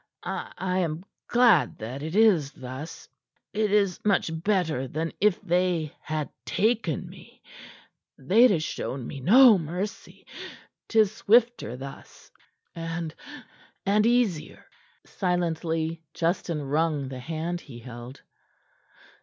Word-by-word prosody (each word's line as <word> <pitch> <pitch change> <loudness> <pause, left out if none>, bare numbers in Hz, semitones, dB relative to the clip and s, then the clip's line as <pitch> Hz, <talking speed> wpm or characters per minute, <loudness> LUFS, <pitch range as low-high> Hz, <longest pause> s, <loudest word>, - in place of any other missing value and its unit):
I - - -4
I 185 0 -1
am 165 0 -2 0.2
glad 240 -1 +4
that 120 +5 -6
it 160 +4 -5
is 190 -10 +4
thus. 130 +5 -8 0.5
It 215 -1 0
is 200 -3 +2
much 200 -5 +2
better 165 -10 0
than 160 +5 -3
if 210 -2 +3
they 175 -3 0
had 155 -2 -3
taken 195 - 0
me. - - -15 0.7
They'd 215 - +5
ha' 195 - +3
shown 135 -4 -4
me 140 - -7
no 225 - +7
mercy. 180 +6 -6 0.6
'Tis 220 -3 +4
swifter 225 - +2
thus, 135 +1 -11 0.4
and 165 -1 -4 0.7
and 210 +3 +3
easier." 235 -10 0 0.4
Silently 165 -3 -1
Justin 165 -2 -1
wrung 150 0 0
the 130 -1 -7
hand 165 +5 -4
he 125 -4 -11
held. 120 +2 -10
165 Hz, 115 wpm, -26 LUFS, 150-200 Hz, 0.7 s, no